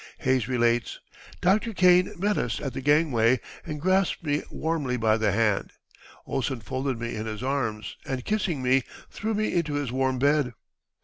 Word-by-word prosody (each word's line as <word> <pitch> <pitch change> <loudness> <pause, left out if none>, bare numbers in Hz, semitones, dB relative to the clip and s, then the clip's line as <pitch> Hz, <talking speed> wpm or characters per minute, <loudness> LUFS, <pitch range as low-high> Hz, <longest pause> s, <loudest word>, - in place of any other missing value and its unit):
Hayes 130 -3 +1
relates, 120 -2 +1 0.4
"Dr. 210 +5 +2
Kane 180 -1 +4
met 205 +3 +1
us 115 - -1
at 135 -4 -4
the 135 - -4
gangway 130 -5 +3 0.2
and 150 -1 -5
grasped 185 +3 +1
me 145 -1 0
warmly 150 -6 -2
by 110 -2 +3
the 110 -2 +1
hand.... 105 -1 +1 0.5
Ohlsen 130 -2 -2
folded 130 +3 -2
me 115 0 -4
in 110 +1 -4
his 110 +2 -5
arms, 115 -6 -2
and, 130 -2 -4
kissing 185 -10 -1
me, 130 +1 +4 0.3
threw 220 +1 -2
me 215 +1 0
into 160 -4 0
his 145 -4 -2
warm 130 0 0
bed." 140 -2 +2
130 Hz, 170 wpm, -26 LUFS, 120-160 Hz, 0.5 s, Kane